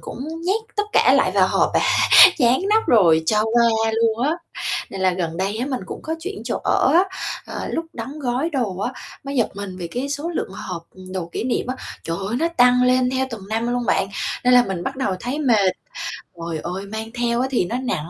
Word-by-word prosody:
cũng - - -8 0.3
nhét 415 +5 +1
tất 415 - +1
cả - - +5
lại - - +3
vào - - +3
hộp - - +2
à, - - +4 0.6
dán 250 +1 +3
nắp 440 +1 +3
rồi 165 -8 +5
cho 210 +5 +2
qua 225 -1 +2
luôn 225 +1 +1
á. - - +2 0.6
Nên 195 - -6
là 185 -1 +3
gần 170 -2 -3
đây 195 +4 -1
á, 250 - -2
mình 260 -3 -2
cũng - - -7
có 320 - -3
chuyển 390 +4 -6
chỗ - - -2
ở - - +3
á, 355 - +7 0.4
ờ, - - -5
lúc 330 0 -2
đóng 260 +6 -7
gói 260 +5 -1
đồ 235 - -2
á, 245 +6 -2 0.3
mới 275 0 -4
giật 235 - +2
mình 200 -2 -6
vì 170 -1 -5
cái 250 +8 -4
số 290 +4 -3
lượng 320 - -3
hộp, 180 -3 -6
ừm, 185 0 -12
đồ 180 -3 -3
kỷ - - -3
niệm 250 -1 -1
á, 255 +1 -3 0.3
trời 165 0 -2
ơi, 230 - -1
nó 335 - +1
tăng 250 0 +5
lên 250 0 +3
theo 260 0 0
từng 210 -4 -8
năm 225 +2 -1
luôn 245 -1 -1
bạn, 195 - +1 0.4
nên 250 - +5
là 245 - +7
mình 190 -4 -4
bắt 265 +6 -4
đầu 265 -8 -1
thấy 255 +4 -3
mệt, 220 -10 +3 0.7
trời 165 -1 -4
ơi, 185 +3 -4
mang 220 +1 -5
theo 240 0 0
á 260 - 0
thì 235 - +1
nó 235 - -3
nặng, 210 -11 -3
235 Hz, 235 wpm, -21 LUFS, 190-260 Hz, 0.7 s, á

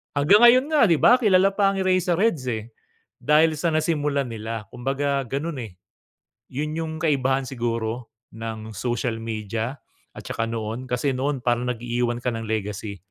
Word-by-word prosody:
Hanggang 145 +9 +5
ngayon 255 +3 +6
nga, 305 - +4
'di 170 - +4
ba, 245 +2 +6
kilala 195 -3 +4
pa 200 0 +3
ang 195 - -2
Eraserheads, 185 - +1
eh. 110 +1 -5 0.5
Dahil 155 +2 +3
sa 170 - 0
nasimulan 150 -3 0
nila, 110 0 -5
kumbaga 135 +2 -1
ganun, 140 +4 -3
eh. 105 -6 -9 0.8
Yun 150 +3 -3
yung 160 -1 -3
kaibahan 135 -4 +1
siguro 115 -1 -3 0.3
ng 110 -1 -6
social 120 -1 -2
media. 115 +3 -4 0.4
At - - -9
tsaka 115 - -2
noon 115 +3 -4
kasi 125 +3 0
noon 135 +2 -1
parang 120 0 +1
nag-iiwan 120 0 -1
ka 125 0 -2
ng 115 0 -4
legacy. 105 -1 -3
130 Hz, 155 wpm, -24 LUFS, 115-155 Hz, 0.8 s, ngayon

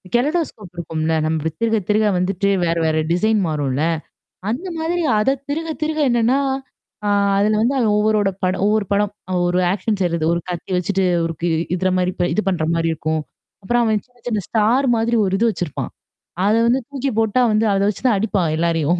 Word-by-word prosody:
கெலொடோஸ்கோப் 255 - -1
இருக்கும்ல்ல, 160 -1 -2
நம்ப 160 0 -1
திருக 225 -1 +2
திருக 215 +1 +3
வந்துட்டு 195 +2 0 0.2
வேற 165 0 +1
வேற 155 0 +1
டிசைன் 215 +5 +2
மாறும்ல்ல. 145 -2 -1 0.7
அந்த 280 +12 -3
மாதிரி 340 +2 -1 0.2
அதைத் 270 +5 0
திருக 325 +3 -2
திருக 310 0 -1
என்னன்னா, 240 +3 +2 0.7
அ - - +1 0.3
அதுல 210 +1 +2
வந்து 255 +4 +1
அவன் 215 -3 +2
ஒவ்வொரோட 210 -2 +2
படம் 185 +1 0
ஒவ்வொரு 210 -1 +2
படம், 205 0 +1 0.4
ஒரு 180 +1 +1
ஆக்ஷன் 205 +1 -2
செய்யறது 170 -3 0
ஒரு 170 - -1
கத்தி 175 +2 -5
வச்சுட்டு 190 +1 0 0.2
ஒருக்கு 165 +1 -2 0.3
இதுர 185 +1 0
மாரி 180 0 0 0.2
இது 215 - 0
பண்ற 175 -4 -1
மாரி 165 0 0
இருக்கும். 155 0 -2 0.4
அப்புறம் 240 +4 +2
அவன் 215 -3 +1
சின்ன 250 0 -31
சின்ன 215 -5 -1
ஸ்டார் 235 +5 +2
மாதிரி 230 +1 +1
ஒரு 190 - -1
இது 230 0 +3
வச்சுருப்பான். 175 -7 -4 0.5
அதை 215 +2 +3
வந்து 250 +3 +3
தூக்கி 275 -1 -2
போட்டா 225 +3 +2
வந்து 215 +1 +2
அத 195 - +1
வச்சுதான் 225 +1 +1
அடிப்பான் 195 -6 0
எல்லாரையும். 170 0 +1
205 Hz, 175 wpm, -20 LUFS, 175-235 Hz, 0.7 s, திருக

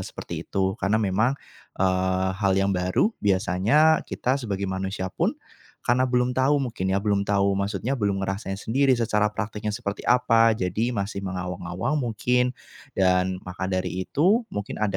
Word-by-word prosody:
seperti - - -6
itu 95 -1 0
karena 100 +2 +2
memang, 105 +5 +2 0.4
eee, 95 0 +1
hal 100 -1 +2
yang 95 0 +2
baru 90 - +1
biasanya 105 - +3
kita 130 +2 0
sebagai 100 -4 -3
manusia 95 0 -3
pun, - - 0 0.5
karena 125 +2 +3
belum 125 0 +1
tahu 135 +3 +3
mungkin 115 -8 -3
ya, 95 - +2
belum 100 -1 +1
tahu 100 -1 +2
maksudnya, 100 +5 -2
belum 100 -2 0
ngerasain 95 0 -3
sendiri 135 +5 +2
secara 105 -2 +1
praktiknya 105 +1 -4
seperti 105 -4 -5
apa, 115 -2 +5
jadi 95 +5 -1
masih 100 0 -3
mengawang-awang 90 - -3
mungkin 125 +1 +1 0.4
dan 90 0 +2
maka 90 +1 -5
dari 95 0 -2
itu 200 - +3
mungkin 105 0 -4
ada 100 -3 0
100 Hz, 150 wpm, -25 LUFS, 95-120 Hz, 0.5 s, apa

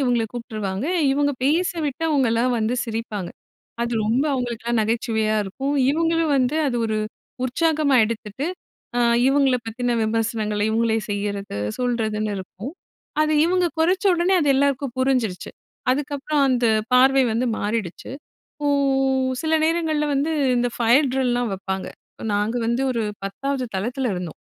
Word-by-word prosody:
இவுங்கள 245 -4 +2
கூப்ட்டுருவாங்க. 215 -2 -4 0.3
இவங்கள 285 +1 +2
பேச 330 +6 +2 0.2
விட்டு, 285 +4 -4
அவுங்கலாம் 250 -4 +2
வந்து 220 +2 0
சிரிப்பாங்க. 220 -5 -4 0.5
அது 235 0 -2
ரொம்ப 240 +6 +2
அவங்களுக்கெல்லாம் 235 -2 -1
நகைச்சுவையா 220 -1 0
இருக்கும். 270 +9 -3 0.2
இவுங்களும் 330 0 +1
வந்து 260 +3 +1
அது 250 -3 0
ஒரு 215 -1 -1 0.5
உற்சாகமா 305 +2 +1
எடுத்துட்டு, 225 +4 -4 0.5
அ 245 - +2 0.3
இவுங்கள 270 -2 +3
பத்தின 240 +1 -1
விமர்சனங்கள, 220 -1 -1
இவுங்களே 225 0 +1
செய்யிறது, 200 - -3 0.2
சொல்றதுன்னு 220 -4 -1
இருக்கும். 190 +7 -8 0.5
அது 310 0 +1
இவுங்க 360 +1 +2
கொறைச்சடோனே 365 +1 +3
அது 295 - +1
எல்லாருக்கும் 275 -2 0
புரிஞ்சுருச்சு. 255 -8 0 0.4
அதுக்கப்புறம் 290 +2 0
அந்த 250 -2 +1 0.3
பார்வை 265 +2 +6
வந்து 235 +3 0
மாறிடுச்சு. 205 -4 -3 0.4
இப்போ 295 -1 -4 0.8
சில 320 0 +1
நேரங்கள்ல 320 -2 +1
வந்து, 280 +3 0 0.3
இந்த 245 0 +1
ஃபயர் 245 +5 +4
ட்ரில்லாம் 245 -3 0
வெப்பாங்க. 190 0 -4 0.5
நாங்க 210 +3 0
வந்து 235 +3 0
ஒரு 235 -3 -1 0.2
10வது 265 +7 -2
தளத்தில 245 +6 -1
இருந்தோம். 180 -3 -6
245 Hz, 125 wpm, -22 LUFS, 220-280 Hz, 0.8 s, பார்வை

